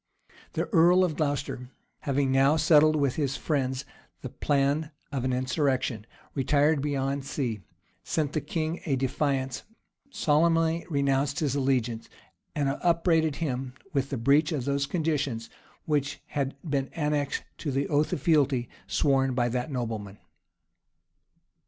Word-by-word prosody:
The - - 0
earl 175 +2 +6
of 170 -4 0
Glocester, 145 -4 -2 0.3
having 140 -1 0
now 135 +3 +4
settled 155 0 +5
with 140 -4 +1
his 140 -3 0
friends 135 -3 -1 0.4
the - - -4
plan 145 +2 0 0.2
of 135 -3 -2
an 130 - 0
insurrection, 130 -3 0 0.3
retired 145 +2 +2
beyond 140 -1 -1
sea, 125 -5 -3 0.4
sent 150 -3 -1
the 155 - 0
king 160 +3 -3
a 140 - +2
defiance, 135 0 -1 0.5
solemnly 165 - +2
renounced 140 -1 +1
his 145 -5 0
allegiance, 125 -4 0 0.5
and 145 -2 +1
upbraided 165 -3 +2
him 130 -5 -3 0.2
with 135 -1 0
the 135 - -2
breach 140 +8 +3
of 140 -6 -2
those 140 0 0
conditions 145 -9 -1 0.3
which 145 -3 0
had 140 -2 -2
been 140 -2 -1
annexed 150 -3 -1 0.2
to 155 - -3
the 135 +1 0
oath 150 0 +1
of 140 - -3
fealty 140 -7 +2 0.2
sworn 135 -2 +2
by 120 -1 +2
that 125 +4 -2
nobleman. 110 -6 -4
140 Hz, 135 wpm, -27 LUFS, 130-155 Hz, 0.5 s, earl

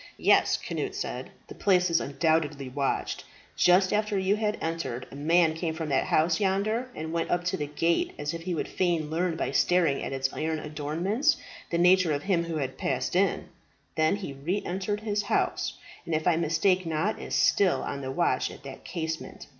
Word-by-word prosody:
"Yes," - - +4
Cnut - - -4
said, - - -4 0.2
"the - - -9
place 180 -3 +2
is 165 - +3
undoubtedly 145 -1 0
watched. 135 +1 -2 0.3
Just 185 +1 +4
after 210 -1 +1
you 190 +1 +2
had 210 -1 -1
entered, 160 -7 -3
a - - -9
man 160 +3 +3
came 160 0 -3
from 160 -1 -4
that 135 -1 +2
house 160 +1 +2
yonder 210 +5 0
and 160 +1 -5
went 165 -1 -1
up 175 0 +1
to 180 +1 0
the 150 - -3
gate, 165 +3 0
as 145 +1 -3
if 165 - -5
he 175 +1 -3
would - - -2
fain 170 -4 0
learn 170 +1 0
by - - -2
staring 170 -6 +2
at - - -4
its 135 0 -1
iron 160 0 -1
adornments 160 - 0 0.3
the 170 - 0
nature 180 -1 +5
of 145 0 -2
him 175 -4 +1
who 165 -1 -4
had 135 -4 -3
passed 130 +4 -1
in. 190 +1 +1 0.5
Then 155 +3 +3
he 190 -9 -6
re 165 +9 -2
entered 195 +3 -2
his 210 -1 0
house, - - -1 0.3
and 165 - 0
if 155 - -1
I 175 - +5
mistake 170 +3 +2
not 165 +7 -1
is - - -3
still 195 -3 +3
on 140 - -4
the 130 - -4
watch 135 -3 +1
at - - -12
that 135 -1 -9
casement. 160 -2 -5
165 Hz, 200 wpm, -27 LUFS, 150-185 Hz, 0.5 s, nature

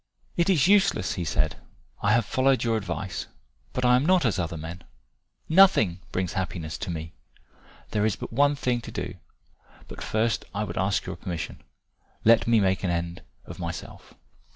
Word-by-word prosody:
"It 170 +2 +2
is 175 -5 +4
useless," 195 - +3
he 90 - -3
said. 80 - 0 0.4
"I 100 - +3
have 115 -2 +3
followed 130 +2 +2
your 115 -1 +1
advice. 95 -2 -4 0.4
But 125 - -1
I 125 0 +6
am 125 - +3
not 180 -1 +3
as 110 -5 +1
other 85 -1 -2
men. 85 +3 -7 0.6
Nothing 160 - +5
brings 90 -2 -2
happiness 90 -5 -4
to - - -4
me. 80 -1 -5 0.8
There 105 - +1
is 110 -2 +2
but - - -8
one 145 +3 +4
thing 125 -3 0
to - - -9
do, - - -4 0.7
but - - -10
first 110 +1 0
I 105 - 0
would 90 -4 -5
ask 95 +1 +1
your - - -5
permission. 85 -3 -5 0.6
Let 115 +1 +6
me 115 -1 +5
make 95 -1 +1
an 90 - 0
end 85 0 -2 0.2
of - - -10
myself." - - -7
105 Hz, 175 wpm, -26 LUFS, 90-125 Hz, 0.8 s, I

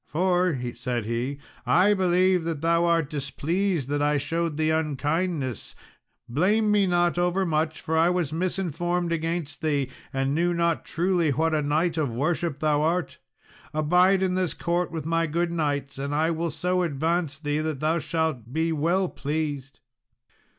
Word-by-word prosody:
"For," 180 -1 +1 0.2
said 120 -2 -3
he, 120 +5 -2 0.3
"I 190 +5 +4
believe 185 -1 +2
that 165 -3 -3
thou 170 +1 +2
art 165 -3 +2
displeased 155 +3 -1
that 145 0 0
I 145 0 +2
showed 165 +2 -2
thee 155 0 +2
unkindness; 150 - -1 0.5
blame 205 - +2
me 205 -2 +3
not 175 -1 +2
overmuch, 170 -3 0
for 160 - -2
I 165 +2 +4
was 175 -5 -1
misinformed 175 0 -1
against 165 -2 -2
thee, 145 -4 0 0.2
and 135 +1 0
knew 175 +3 +1
not 170 -1 0
truly 175 -2 +1
what 160 +3 +1
a 155 - +2
knight 160 +3 0
of 145 -5 0
worship 155 +2 -1
thou 150 -1 +1
art. 165 0 -1 0.6
Abide 180 +5 +4
in 185 -1 +1
this 185 -2 -1
court 175 0 -1
with 160 -3 -5
my 165 0 +1
good 170 +2 -1
knights, 145 -4 -2
and 140 +1 -2
I 160 +2 +2
will 165 +1 -1
so 180 +4 -1
advance 160 -1 -1
thee 150 -1 -2
that 155 -3 -2
thou 160 +3 +1
shalt 155 -8 -2
be 160 +3 0
well 170 +5 +1
pleased." 145 -3 -4
160 Hz, 160 wpm, -25 LUFS, 145-175 Hz, 0.6 s, I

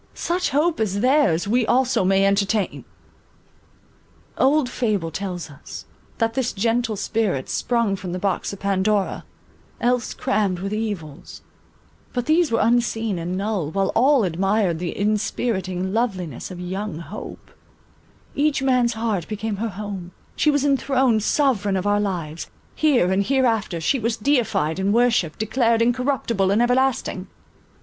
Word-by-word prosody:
Such 355 +1 -1
hope 305 +2 +1
as 200 -2 0
theirs, 255 - +3
we 240 +4 +2
also 250 -1 +2
may 195 +1 +3
entertain! 200 +1 0 1.5
Old 280 +1 +3
fable 210 -10 -1
tells 180 -1 -4
us, 140 - -10 0.3
that 225 -1 0
this 250 0 -1
gentle 225 +2 0
spirit 200 -10 -1
sprung 235 -5 0
from 185 -2 -6
the 180 - -3
box 190 -1 -1
of 200 - -8
Pandora, 200 +1 0 0.5
else 245 -1 0
crammed 200 -3 0
with 195 +3 -4
evils; 205 -10 -5 0.7
but 245 -1 -2
these 320 -1 +3
were 230 - +2
unseen 225 -4 +1
and 175 +2 -3
null, 195 -6 -2
while 195 +3 0
all 265 +1 +4
admired 190 0 +1
the 175 -1 -4
inspiriting 200 -3 -1
loveliness 190 - -2
of 180 -2 -8
young 185 0 -4
Hope; 170 +5 -9 0.8
each 285 -1 +1
man's 250 -3 +2
heart 220 -6 -2
became 215 -1 -3
her 225 +3 -2
home; 195 -3 -7 0.2
she 305 - +2
was 290 -1 +2
enthroned 265 -4 +2
sovereign 210 -6 +1
of 185 - -3
our 205 0 +2
lives, 170 -6 -3 0.2
here 260 - +2
and 190 +1 +2
here 265 +5 +2
after; 220 -7 0
she 255 - +1
was 230 +1 -1
deified 215 - +1
and 200 +3 +1
worshipped, 230 -10 +2
declared 230 +1 +1
incorruptible 235 -4 +1
and 200 +3 +2
everlasting. 245 -6 +1
215 Hz, 145 wpm, -22 LUFS, 190-245 Hz, 1.5 s, all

